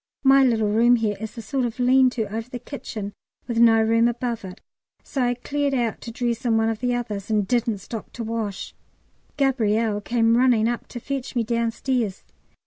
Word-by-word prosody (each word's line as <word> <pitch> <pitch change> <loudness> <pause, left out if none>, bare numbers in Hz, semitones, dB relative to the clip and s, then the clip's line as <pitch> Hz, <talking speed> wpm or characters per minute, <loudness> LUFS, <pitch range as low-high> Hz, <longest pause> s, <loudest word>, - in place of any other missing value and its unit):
My 270 0 +6
little 220 -5 +2
room 235 +3 +5
here 220 -3 0
is 220 +2 -7
a 230 - -6
sort 270 0 -1
of 235 -1 -3
lean 255 +1 +5
to 245 -2 -2
over 225 +2 -4
the 250 - -5
kitchen 215 -6 -7 0.3
with 235 -2 -1
no 225 -1 +6
room 230 +1 +3
above 240 -1 -2
it; 185 -1 -9 0.4
so 270 - -3
I 245 0 +1
cleared 285 +2 -1
out 235 -3 -1
to 230 - -7
dress 235 0 -2
in 230 -3 +2
one 225 0 +2
of 225 -1 -3
the 245 0 0
others, 215 -5 -4
and 210 -3 +1
didn't 235 -2 +1
stop 215 +3 -8
to 235 - -5
wash. 220 -3 -4 0.6
Gabrielle 225 -6 +1
came 230 +1 +2
running 240 -3 +4
up 240 0 -3
to 240 - -7
fetch 275 +1 -5
me 240 - +2
downstairs. 235 -1 -1
235 Hz, 200 wpm, -23 LUFS, 220-245 Hz, 0.6 s, My